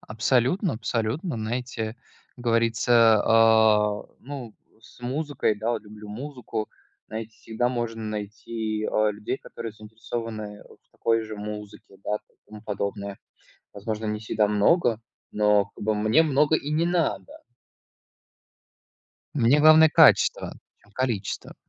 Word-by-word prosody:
Абсолютно, 130 - +1
абсолютно, 115 - -2
знаете, 110 0 -4 0.4
говорится, 115 -1 +3
а 110 -2 +4 0.2
ну 130 -5 -8 0.3
с 115 - -18
музыкой, 135 -1 -1
да, 110 +3 -2
вот 115 - -3
люблю 105 0 -12
музыку, 125 -1 -5 0.4
знаете, 110 +1 -6
всегда 115 +2 -2
можно 120 -2 -3
найти, 110 +1 -4
э, 110 0 +2
людей, 105 +5 -4
которые 115 -4 -8
заинтересованы 110 -1 -7
в - - -18
такой 115 0 0
же 110 -1 -7
музыке, 105 -1 -8
да, 105 - -1 0.2
и - - -38
тому 105 -1 -11
подобное. 100 -1 -4 0.6
Возможно, 110 +2 -4
не 105 0 -2
всегда 110 -1 0
много, 115 - +2 0.3
но, 105 -1 +3
как - - -8
бы, 110 +1 +1
мне 110 +8 +3
много 150 0 +3
и 145 - -3
не 160 +2 +1
надо. 170 - -2 1.9
Мне 135 +1 +4
главное 155 +1 +7
качество, - - +4 0.3
чем 105 - -25
количество. 115 -4 -3
110 Hz, 125 wpm, -25 LUFS, 105-125 Hz, 1.9 s, главное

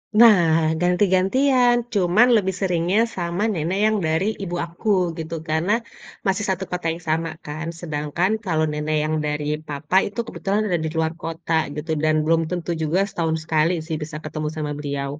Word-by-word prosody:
Nah, 170 -8 +6
ganti-gantian, 205 +8 +3 0.2
cuman 200 +4 +4
lebih 190 -4 +1
seringnya 180 +1 +1 0.2
sama 175 +2 -2
nenek 175 +3 -1
yang 215 0 +3
dari 160 +4 +1 0.2
ibu 175 -2 -4
aku 170 +6 -5 0.3
gitu, 160 +1 -5 0.2
karena 160 +5 +1 0.6
masih 195 +1 +1
1 190 0 -1
kota 180 -1 -4
yang 170 +1 -10
sama 165 +1 0 0.2
kan, 155 +2 -5
sedangkan 155 +3 -1
kalau 160 -4 +1
nenek 150 +1 -2
yang 155 +1 0
dari 150 0 -2 0.2
papa 150 +4 -4
itu 200 - -7
kebetulan 200 0 -1
ada 175 -4 0
di - - -1
luar 160 0 +1
kota 165 0 -4 0.2
gitu, 150 +2 -6
dan 155 0 +3
belum 165 +1 +3
tentu 175 -1 -2
juga 160 +4 +1
setahun 165 -2 -1
sekali 160 +1 +2 0.2
sih, 160 - -2
bisa 150 0 -7
ketemu 155 0 -4
sama 150 -1 -2
beliau. 140 0 -4
165 Hz, 170 wpm, -22 LUFS, 155-190 Hz, 0.6 s, Nah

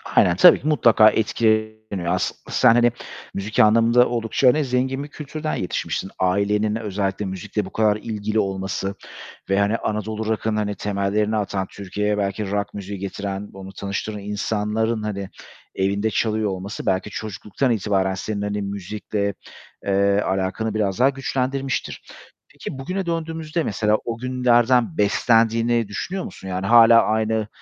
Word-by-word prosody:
Aynen, 85 - +5
tabii 95 - +7
ki 145 - -4
mutlaka 115 -7 +6
etkileniyor. 110 -3 0
As - - 0 0.2
sen, 125 -3 +5
hani, 120 0 +4 0.4
müzik 105 +2 -3
anlamında 115 +3 +5
oldukça, 115 +2 +1
hani, 145 +3 +4
zengin 130 +2 -1
bir - - -7
kültürden 155 +1 -5
yetişmişsin. 95 +1 -3
Ailenin 100 +3 +1
özellikle 100 -2 -2
müzikle 95 +2 -3
bu - - -8
kadar 110 -2 +2
ilgili 110 0 -2
olması 95 0 -2 0.5
ve, 95 +1 +2
hani, 105 +3 +2
Anadolu 110 +1 -3
Rock'ın, 110 0 -1
hani, 105 -1 -1
temellerini 105 +2 -1
atan, 100 -2 -2
Türkiye'ye 105 +2 -2
belki 100 0 -2
rock 100 0 -2
müziği 100 -1 -6
getiren, 100 +1 -5
onu 95 0 -10
tanıştıran 100 +2 -4
insanların, 105 +2 -1
hani, 100 -2 -4 0.5
evinde 100 +3 0
çalıyor 110 -1 0
olması 95 +2 -5
belki 95 +2 0
çocukluktan 110 +5 -3
itibaren 95 -3 +1
senin, 100 +2 -4
hani, 105 0 -2
müzikle, 100 +1 -3 0.5
eee, 100 +1 +2
alakanı 95 +3 -1
biraz 105 -1 -1
daha 135 +2 +5
güçlendirmiştir. 135 0 -2 0.5
Peki, 135 - -7
bugüne 185 +7 -3
döndüğümüzde, 165 -1 -2
mesela, 105 -1 +1
o 115 -1 -3
günlerden 125 +2 +2
beslendiğini 115 +1 +2
düşünüyor 180 - -4
musun, - - -10
yani 95 0 -3
hâlâ 115 +1 +7
aynı, 110 0 0
105 Hz, 140 wpm, -22 LUFS, 100-115 Hz, 0.5 s, tabii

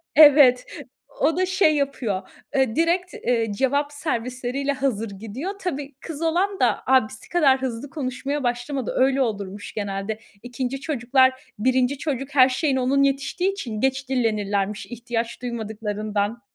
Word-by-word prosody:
Evet, 285 -5 +7 0.6
o 325 - +3
da 370 - +2
şey 370 -5 +3
yapıyor, 235 -9 -2 0.3
eee, 265 -3 +2
direkt, 345 +3 +1
eee, 230 -3 0
cevap 285 +5 0
servisleriyle 260 -1 -2
hazır 245 -6 -1
gidiyor. 225 - -6
Tabii, 290 -6 -4
kız 320 -1 -7
olan 365 +5 +1
da - - +2
abisi 260 -5 +1
kadar 275 -6 +3
hızlı 260 +1 -4
konuşmaya 275 0 -3
başlamadı. 245 +2 -2
Öyle 265 +1 +3
olurmuş 205 -4 -3
genelde. 200 +1 -3 0.2
2. 255 +2 -4
çocuklar, 260 -2 +3 0.3
1. 260 +3 +2
çocuk 280 -1 -4
her 260 -1 +7
şeyine 265 0 0
onun 275 +2 +2
yetiştiği 275 +8 0
için 230 - -5
geç 265 0 0
dillenirlermiş, 210 -5 0
ihtiyaç 240 0 -4
duymadıklarından. 215 -1 -3
260 Hz, 135 wpm, -23 LUFS, 230-285 Hz, 0.6 s, Evet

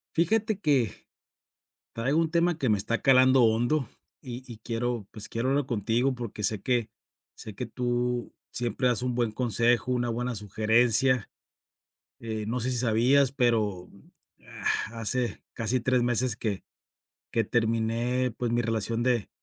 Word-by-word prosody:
Fíjate 210 +5 +1
que, 140 - +2 1.0
traigo 135 +8 0
un 160 -1 0
tema 170 0 +2
que 135 - -1
me 105 - +3
está 105 +2 -1
calando 130 -1 +5
hondo 120 +5 +1 0.3
y 125 -2 -7
y 115 - -9
quiero, 115 -1 -3
pues, 110 -1 -6
quiero 115 +2 -2
hablarlo 140 +1 +1
contigo 120 +3 0
porque 115 -3 -6
sé 105 -1 0
que 120 -1 0 0.5
sé 110 - -10
que 125 - -4
tú 120 0 -2 0.2
siempre 120 +1 -1
das 120 -1 +1
un 125 -1 -2
buen 120 -2 0
consejo, 120 +1 +1
una 120 -1 -1
buena 120 +1 -2
sugerencia, 110 +4 +2 0.9
eh, 110 -2 -4
no 120 +3 -2
sé 125 - -1
si 125 - -1
sabías, 125 +3 +3
pero, 110 -8 0
mm, 100 - -20 0.4
ah, 115 +1 -3
hace 120 +2 0
casi 115 +3 -1
3 125 +1 +2
meses, 120 -1 +1
que 105 -5 -3 0.7
que 115 - +1
terminé 115 +3 0
pues 120 -2 -2
mi 120 0 +1
relación 115 +1 0
de 120 -4 +1
120 Hz, 155 wpm, -27 LUFS, 110-125 Hz, 1.0 s, calando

